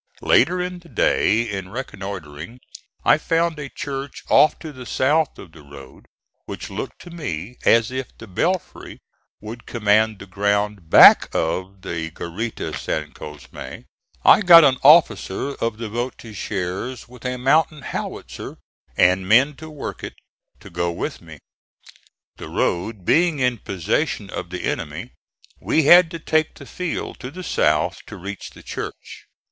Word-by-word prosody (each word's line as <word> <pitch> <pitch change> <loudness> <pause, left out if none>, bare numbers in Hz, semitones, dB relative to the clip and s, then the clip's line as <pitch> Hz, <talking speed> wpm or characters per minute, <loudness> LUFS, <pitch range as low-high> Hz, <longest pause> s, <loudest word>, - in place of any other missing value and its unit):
Later 175 +8 +4
in 180 0 -4
the 170 -1 -18
day 115 -6 +2
in 95 -5 -5
reconnoitring 95 - -7 0.5
I - - +5
found 165 0 0
a 140 -2 -6
church 135 0 -6
off 155 - +5
to 155 -2 -9
the 130 -2 -10
south 150 +3 +1
of 85 - -12
the 80 - -15
road, 70 -2 -14 0.4
which - - -7
looked - - -6
to 175 - -12
me 120 - -6
as 115 +1 +4
if 130 -1 -4
the 110 - -10
belfry 170 - -3 0.4
would 110 +2 -9
command 110 -1 +2
the 100 - -11
ground 100 -1 -1
back - - +8
of 95 +4 -2
the 80 -1 -4
garita 90 +8 -5
San 75 -1 -3
Cosme. 75 -3 -11 0.7
I - - +7
got 170 -4 +9
an 135 -3 +4
officer 135 - +4
of 115 -4 -3
the 115 0 -5
voltigeurs, 110 -1 -5
with 125 -1 -15
a 125 0 -2
mountain 150 +3 +2
howitzer - - -6 0.4
and 95 +1 +3
men 135 +6 +5
to 160 0 -10
work 150 -3 -7
it, - - -6 0.5
to - - -13
go 85 0 -1
with 85 - -5
me. - - -12 1.0
The - - -9
road 95 +2 -2
being 170 - +3
in 125 -3 0
possession 95 -5 -2
of - - -6
the - - -6
enemy, - - -4 0.5
we 160 - +1
had 175 +3 +7
to 165 - -6
take 155 -1 0
the - - -12
field 180 -2 -5
to 125 - -7
the 185 +6 -9
south 75 - +1
to - - -9
reach 100 +2 -7
the - - -16
church. - - -8
115 Hz, 155 wpm, -21 LUFS, 95-150 Hz, 1.0 s, got